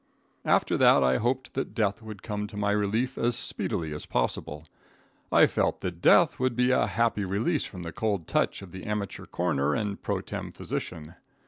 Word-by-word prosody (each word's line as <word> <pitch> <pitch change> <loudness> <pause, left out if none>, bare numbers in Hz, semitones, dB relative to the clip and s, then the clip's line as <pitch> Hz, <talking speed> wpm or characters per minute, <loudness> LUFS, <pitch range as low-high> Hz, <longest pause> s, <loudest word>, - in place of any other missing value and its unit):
After - - +2
that 70 - +6
I 65 0 +3
hoped 130 +3 -1
that 135 -5 -3
death 105 -2 0
would 110 -3 -9
come 105 -1 -3
to 105 - -10
my 100 0 +1
relief 110 +5 0
as 120 0 +1
speedily 80 -7 -1
as 75 - -6
possible. 75 +5 -2 0.7
I - - +7
felt - - 0
that 90 -2 -5
death - - +5
would 130 -1 +1
be 125 +1 +3
a 125 - +3
happy 110 +1 +1
release 110 - 0
from 90 -3 -8
the 85 - -5
cold 105 -8 -1
touch - - 0
of 95 - -11
the 95 - -8
amateur 105 -2 -3
coroner 75 -5 0
and 105 -3 -3
pro - - -2
tem - - -6
physician. 80 0 -5
100 Hz, 190 wpm, -27 LUFS, 85-115 Hz, 0.7 s, I